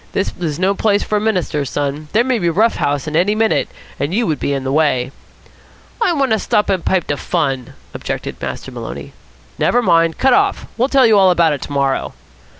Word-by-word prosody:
"This 195 - -1
is 155 -4 -2
no 190 +2 +2
place 205 0 +1
for 210 - -1
a - - -1
minister's 175 -10 -1
son. 145 +1 -3
There 225 +3 +3
may 255 -2 0
be 175 - 0
a - - +2
rough 220 +7 +2
house 145 0 -1
in 150 - -5
here 165 - +4
any 205 +4 0
minute, 220 0 +1 0.3
and 150 +6 -1
you 235 +1 +1
would 155 -6 -1
be - - -2
in 135 -1 -2
the 130 - -2
way." 135 -4 +1 0.9
"I 370 - +3
want 275 -5 0
to 220 - +2
stop 210 0 +1
and 185 -3 -1
pipe 190 -3 +1
de 145 - -2
fun," 135 -6 -2 0.2
objected - - -5
Master - - -5
Maloney. - - -8 0.5
"Never 245 - +2
mind. 165 -4 +3
Cut 265 - +3
off. 400 0 +1
We'll 250 +3 +1
tell 270 -2 +4
you 220 -3 +5
all 190 -1 +5
about 170 -3 +3
it 140 - -5
to - - -7
morrow." 140 -1 -1
175 Hz, 230 wpm, -17 LUFS, 145-220 Hz, 0.9 s, you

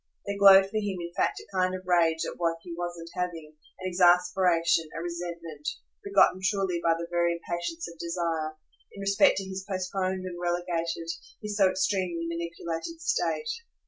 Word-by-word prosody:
There 200 - -2
glowed 195 -1 +9
for 215 +2 -3
him 205 -3 -1
in 170 0 -5
fact - - +1
a - - -15
kind 185 0 +2
of 185 - -7
rage 165 -3 +3
at - - -6
what 165 -1 +1
he 175 - -7
wasn't 175 -1 -5
having; 165 -4 -4 0.3
an 185 - -2
exasperation, 175 -2 +3
a - - -2
resentment, 170 -3 -5 0.3
begotten 400 - +4
truly 195 -4 0
by 165 -1 +4
the 170 +1 -4
very 170 0 +2
impatience 175 - -4
of 170 -1 -12
desire, 165 -2 -2 0.4
in - - -11
respect 200 +8 +4
to 195 - -1
his 190 0 -6
postponed 185 0 -2
and 175 -1 -6
relegated, 175 -1 -1 0.4
his 210 -1 -3
so 195 -2 +5
extremely 185 -3 0
manipulated 170 - -4
state. 460 +6 0
175 Hz, 170 wpm, -28 LUFS, 170-190 Hz, 0.4 s, glowed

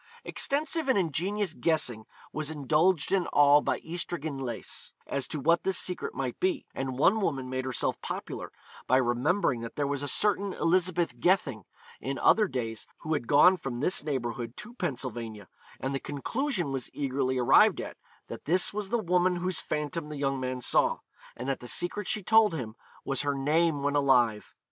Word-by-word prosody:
Extensive 295 +1 0
and 260 - +4
ingenious 185 +2 0
guessing 125 -11 0 0.3
was 155 -1 -2
indulged 155 +3 +1
in 190 -3 +2
by - - -5
all 145 0 +6
Ystradgynlais, 150 -9 -4
as 140 -1 -1
to 155 - -4
what 170 +5 +3
this 190 -1 +1
secret 185 - -2
might - - -3
be; 365 -5 0
and 130 -1 -4
one 205 +10 +4
woman 135 -8 -1
made 130 0 -2
herself 130 - -2
popular - - -6 0.4
by 130 - +4
remembering 130 +2 +1
that 115 - -7
there 145 - 0
was 140 0 -2
a 145 - -3
certain 200 +5 +1
Elizabeth 170 -5 +1
Gething 135 - +1 0.3
in 135 +1 -4
other 215 +1 +4
days 115 - -4
who 160 -1 -2
had 125 -6 -2
gone 180 +6 +6
from 125 -7 -5
this 180 +5 +1
neighbourhood 120 -4 -3
to 220 +3 -8
Pennsylvania, 120 - -5 0.3
and 135 +1 -3
the 135 - -1
conclusion 175 - -2
was 135 -2 -3
eagerly 135 -2 -1
arrived 125 -1 +5
at, - - -6 0.3
that - - -9
this 180 +6 +2
was 205 -1 -3
the 235 - +1
woman 180 -3 +2
whose 180 0 0
phantom 150 +1 -3
the 150 - -6
young 135 -1 -1
man 130 0 -3
saw, - - +2 0.4
and 125 - -5
that 135 - -1
the 125 - -9
secret 175 +7 0
she 210 - 0
told 220 -3 +4
him 115 -7 -5 0.3
was 135 -2 -1
her 145 -1 -1
name 150 +2 +1
when 145 0 0
alive. 125 -6 +2
145 Hz, 175 wpm, -28 LUFS, 130-180 Hz, 0.4 s, all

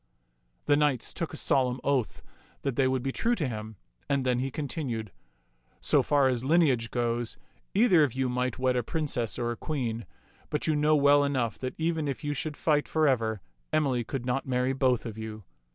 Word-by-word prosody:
The 145 - +4
knights 145 -4 +1
took 170 -3 -3
a 155 - -6
solemn 130 -3 +2
oath 135 -5 0 0.4
that 135 -3 -1
they 135 0 +3
would 130 -1 0
be 135 - -1
true 235 - +1
to 155 - -1
him, 110 -2 -6 0.3
and 140 -2 +1
then 125 -1 +2
he 135 +2 -1
continued, 125 - -4 0.4
" - - -43 0.3
So - - +3
far 140 -2 +3
as 125 -2 0
lineage 135 -6 +3
goes, 120 -1 -1 0.4
either 195 -6 +5
of 145 -6 +2
you 130 0 0
might 125 0 -1
wed 130 -1 +1
a 125 - +2
princess 125 -4 -2
or 120 -1 -1
a - - -3
queen; 115 -6 -3 0.4
but 150 - -1
you 155 - +2
know 150 +1 +3
well 145 0 +5
enough 130 -5 -1
that 130 -1 -4
even 160 -2 0
if 140 +3 -4
you 145 0 -1
should 150 +1 -4
fight 150 -2 +1
forever, 115 - +1 0.3
Emily 140 -6 +1
could 125 +1 -5
not 130 +2 -1
marry 130 +1 +1
both 130 -3 +1
of 110 -1 -6
you. 110 -1 -7
130 Hz, 200 wpm, -28 LUFS, 120-145 Hz, 0.4 s, either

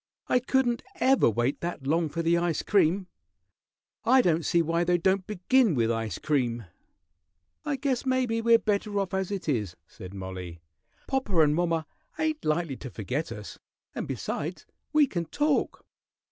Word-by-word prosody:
I 250 - +3
couldn't 245 -1 +1
ever 270 - +4
wait 120 +5 -1
that 170 -5 -4
long 160 +3 +1
for 165 +3 -3
the 165 +1 +3
ice 170 -2 0
cream. 190 -1 +2 1.0
I 255 +2 +5
don't 165 -1 +2
see 170 +1 +2
why 165 +2 +1
they 175 0 +2
don't 190 +2 +1
begin 210 - +2
with 115 -2 +2
ice 115 -4 -2
cream." 120 -6 -1 1.0
"I 295 -2 0
guess 265 -2 -1
maybe 255 -4 +1
we're 230 0 +6
better 205 -1 -1
off 195 -2 -2
as 190 -1 -1
it 195 -5 -4
is," 105 - -1
said 95 +1 -11
Mollie. 95 -3 -7 0.5
"Popper 210 - +2
and 150 -1 +3
mommer 165 -1 0 0.3
ain't 310 -1 -1
likely 155 -3 0
to 130 - -8
forget 125 +6 -3
us, 105 -2 -8 0.3
and, - - -4
besides, 165 +5 -4 0.3
we 305 -1 +5
can 170 -10 -3
talk." 295 - 0
175 Hz, 160 wpm, -27 LUFS, 140-230 Hz, 1.0 s, we're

